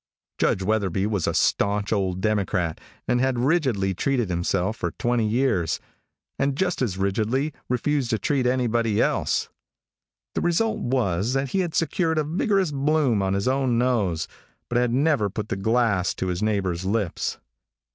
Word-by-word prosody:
Judge 95 Hz, -, +1 dB
Wetherby 100 Hz, -2 st, 0 dB
was 105 Hz, -5 st, -1 dB
a -, -, +1 dB
staunch 100 Hz, +1 st, +1 dB
old 95 Hz, -3 st, -1 dB
Democrat 100 Hz, -5 st, 0 dB, 0.3 s
and 125 Hz, -, +2 dB
had 130 Hz, -1 st, +1 dB
rigidly 125 Hz, -, +1 dB
treated 120 Hz, +1 st, 0 dB
himself 90 Hz, +4 st, 0 dB
for 85 Hz, -, -2 dB
twenty 120 Hz, +4 st, 0 dB
years, 110 Hz, -, +1 dB, 0.6 s
and 135 Hz, 0 st, +1 dB
just 180 Hz, +1 st, -1 dB
as 105 Hz, -8 st, -1 dB
rigidly 110 Hz, +9 st, 0 dB, 0.2 s
refused 130 Hz, +1 st, 0 dB
to 110 Hz, -, +1 dB
treat 130 Hz, +4 st, 0 dB
anybody 120 Hz, -4 st, +1 dB
else. -, -, +1 dB, 0.8 s
The -, -, -1 dB
result 215 Hz, +6 st, +1 dB
was 115 Hz, -4 st, 0 dB
that 135 Hz, 0 st, 0 dB
he 195 Hz, -, 0 dB
had 175 Hz, -4 st, -1 dB
secured 165 Hz, 0 st, +1 dB
a 155 Hz, -, +2 dB
vigorous 185 Hz, +3 st, +1 dB
bloom 140 Hz, -5 st, +2 dB
on 95 Hz, 0 st, 0 dB
his 100 Hz, +3 st, -1 dB
own 130 Hz, -2 st, +1 dB
nose, 105 Hz, -10 st, +1 dB, 0.4 s
but 120 Hz, -, +2 dB
had 125 Hz, -1 st, +1 dB
never 135 Hz, -5 st, +2 dB
put 105 Hz, +2 st, -5 dB
the -, -, -1 dB
glass 100 Hz, -3 st, +1 dB
to 95 Hz, -, -2 dB
his 90 Hz, +1 st, -2 dB
neighbor's 95 Hz, -5 st, 0 dB
lips. 100 Hz, -2 st, -1 dB
115 Hz, 160 wpm, -24 LUFS, 95-135 Hz, 0.8 s, and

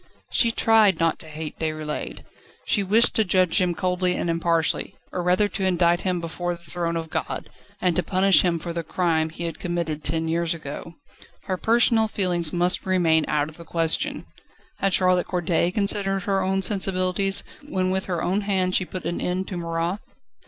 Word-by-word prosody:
She 235 Hz, -, +4 dB
tried 220 Hz, -5 st, +4 dB
not 165 Hz, 0 st, +1 dB
to 160 Hz, -, -7 dB
hate 155 Hz, 0 st, -7 dB
Déroulède. 155 Hz, -1 st, -4 dB, 0.4 s
She 205 Hz, -, +2 dB
wished 215 Hz, +5 st, +3 dB
to 220 Hz, -, +3 dB
judge 185 Hz, -1 st, +3 dB
him 175 Hz, -2 st, +1 dB
coldly 180 Hz, 0 st, 0 dB
and 170 Hz, -, -1 dB
impartially, 165 Hz, -1 st, 0 dB, 0.2 s
or 180 Hz, -, -2 dB
rather 180 Hz, +4 st, +3 dB
to 195 Hz, -, -4 dB
indict 175 Hz, -2 st, +3 dB
him 185 Hz, -2 st, -1 dB
before 175 Hz, +1 st, -3 dB
the 170 Hz, -, -15 dB
throne 170 Hz, +1 st, -2 dB
of 160 Hz, -1 st, -6 dB
God, -, -, -4 dB, 0.3 s
and 180 Hz, -2 st, +1 dB
to 180 Hz, -, +2 dB
punish 185 Hz, -1 st, +4 dB
him 175 Hz, -2 st, +1 dB
for 170 Hz, +1 st, -5 dB
the 170 Hz, -, -2 dB
crime 160 Hz, -1 st, 0 dB
he 165 Hz, +2 st, -7 dB
had 165 Hz, -1 st, -4 dB
committed 170 Hz, -3 st, -3 dB
ten 165 Hz, 0 st, -1 dB
years 170 Hz, 0 st, 0 dB
ago. 160 Hz, +2 st, -8 dB, 0.5 s
Her 190 Hz, -2 st, -2 dB
personal 225 Hz, +2 st, +3 dB
feelings 175 Hz, -6 st, 0 dB
must 175 Hz, +1 st, +1 dB
remain 170 Hz, -4 st, +2 dB
out 150 Hz, -1 st, 0 dB
of 155 Hz, -, -12 dB
the 170 Hz, -, -10 dB
question. 165 Hz, 0 st, -1 dB, 0.5 s
Had 195 Hz, -2 st, +2 dB
Charlotte 185 Hz, -1 st, +2 dB
Corday 175 Hz, -1 st, +1 dB
considered 195 Hz, -1 st, 0 dB
her 195 Hz, -1 st, 0 dB
own 190 Hz, +1 st, 0 dB
sensibilities, 190 Hz, -1 st, +1 dB, 0.3 s
when 185 Hz, -4 st, 0 dB
with 190 Hz, 0 st, -1 dB
her 175 Hz, -3 st, -2 dB
own 190 Hz, +4 st, +1 dB
hand 190 Hz, -2 st, 0 dB
she 185 Hz, -, +2 dB
put 185 Hz, 0 st, -7 dB
an 175 Hz, -, -2 dB
end 185 Hz, +1 st, -2 dB
to 185 Hz, -, -5 dB
Marat? 170 Hz, +3 st, -2 dB
180 Hz, 190 wpm, -24 LUFS, 165-190 Hz, 0.5 s, She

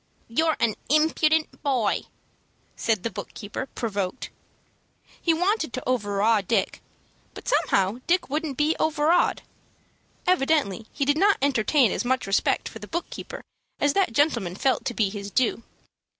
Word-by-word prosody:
"You're 315 Hz, +7 st, +1 dB
an 225 Hz, -2 st, +2 dB, 0.2 s
impudent 310 Hz, +1 st, +2 dB
boy," 255 Hz, -7 st, 0 dB, 0.7 s
said 220 Hz, -5 st, 0 dB
the 230 Hz, -, -2 dB
book -, -, -8 dB
keeper, 225 Hz, +5 st, -5 dB
provoked. 205 Hz, -2 st, -4 dB, 0.9 s
He 335 Hz, -, +3 dB
wanted 360 Hz, -, 0 dB
to 255 Hz, -, -5 dB
overawe 210 Hz, -2 st, +2 dB
Dick; 195 Hz, 0 st, -1 dB, 0.5 s
but -, -, -10 dB
somehow 195 Hz, +4 st, +2 dB
Dick 360 Hz, +2 st, +2 dB
wouldn't 295 Hz, -1 st, -3 dB
be 305 Hz, +2 st, +2 dB
overawed. 315 Hz, +2 st, +2 dB, 0.8 s
Evidently 275 Hz, -, +1 dB
he 280 Hz, -, -1 dB
did 290 Hz, +2 st, +2 dB
not 405 Hz, +2 st, +4 dB
entertain 265 Hz, -1 st, +3 dB
as -, -, -1 dB
much 255 Hz, +1 st, 0 dB
respect 195 Hz, +1 st, +1 dB
for 225 Hz, -, -9 dB
the 210 Hz, -, -9 dB
book 340 Hz, +8 st, -4 dB
keeper -, -, -8 dB, 0.4 s
as 290 Hz, 0 st, +2 dB
that 390 Hz, -7 st, +2 dB
gentleman 225 Hz, -, +1 dB
felt 260 Hz, +5 st, 0 dB
to 240 Hz, -, -2 dB
be 210 Hz, -3 st, +2 dB
his 200 Hz, -1 st, -6 dB
due. 235 Hz, +1 st, +1 dB
260 Hz, 150 wpm, -25 LUFS, 215-315 Hz, 0.9 s, not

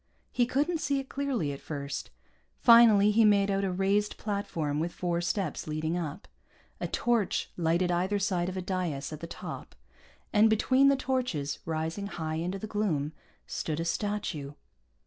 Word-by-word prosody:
He 245 Hz, -1 st, +2 dB
couldn't 300 Hz, +6 st, 0 dB
see 280 Hz, -3 st, 0 dB
it 270 Hz, -, -7 dB
clearly, 265 Hz, -, -1 dB
at 140 Hz, -, -7 dB
first. 140 Hz, -2 st, -5 dB, 0.5 s
Finally, 225 Hz, -4 st, +7 dB
he 225 Hz, +2 st, +4 dB
made 200 Hz, -2 st, +4 dB
out 195 Hz, 0 st, 0 dB
a 190 Hz, -, 0 dB
raised 195 Hz, +3 st, +1 dB
platform 195 Hz, -8 st, -2 dB
with 170 Hz, +2 st, -1 dB
four 175 Hz, -1 st, -1 dB
steps 185 Hz, +1 st, -2 dB
leading 155 Hz, +2 st, -2 dB
up. 165 Hz, +1 st, -4 dB, 0.5 s
A -, -, -2 dB
torch 235 Hz, -4 st, 0 dB
lighted 170 Hz, +1 st, +1 dB
either 185 Hz, +4 st, +1 dB
side 185 Hz, -3 st, 0 dB
of 185 Hz, -, -5 dB
a 185 Hz, -, -3 dB
dais 175 Hz, -6 st, -2 dB
at 155 Hz, -, -7 dB
the 165 Hz, -, -6 dB
top, -, -, -8 dB, 0.6 s
and 215 Hz, +1 st, +6 dB
between 255 Hz, +5 st, +4 dB
the 275 Hz, -, +5 dB
torches, 250 Hz, -, -2 dB
rising 160 Hz, +5 st, -2 dB
high 160 Hz, -4 st, -4 dB
into 180 Hz, +4 st, -2 dB
the 195 Hz, -, -6 dB
gloom, 175 Hz, -9 st, -1 dB, 0.3 s
stood 155 Hz, -1 st, -3 dB
a 165 Hz, -, -1 dB
statue. 170 Hz, -6 st, -2 dB
190 Hz, 165 wpm, -29 LUFS, 160-215 Hz, 0.6 s, Finally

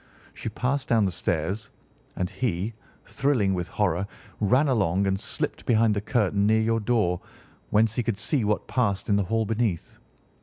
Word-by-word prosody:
She -, -, -5 dB
passed 135 Hz, +2 st, -1 dB
down 115 Hz, -3 st, +3 dB
the 95 Hz, -, 0 dB
stairs, 90 Hz, +5 st, -2 dB, 0.5 s
and 90 Hz, -, -1 dB
he, 105 Hz, -1 st, -2 dB, 0.3 s
thrilling 125 Hz, -9 st, +1 dB
with 90 Hz, -2 st, -2 dB
horror, 95 Hz, -2 st, 0 dB, 0.3 s
ran 125 Hz, +8 st, +3 dB
along 100 Hz, -7 st, +2 dB
and 95 Hz, 0 st, 0 dB
slipped -, -, -3 dB
behind 115 Hz, -2 st, +4 dB
the 100 Hz, -, -1 dB
curtain 105 Hz, -3 st, +1 dB
near 110 Hz, +1 st, +4 dB
your 115 Hz, +1 st, +1 dB
door, 105 Hz, -6 st, +1 dB, 0.5 s
whence 110 Hz, +1 st, +3 dB
he -, -, +3 dB
could 115 Hz, -3 st, -2 dB
see 115 Hz, +4 st, 0 dB
what 105 Hz, 0 st, 0 dB
passed 100 Hz, -7 st, 0 dB
in 100 Hz, -, +4 dB
the 100 Hz, -1 st, +1 dB
hall 110 Hz, +3 st, 0 dB
beneath. 110 Hz, -5 st, -2 dB
105 Hz, 175 wpm, -26 LUFS, 95-115 Hz, 0.5 s, behind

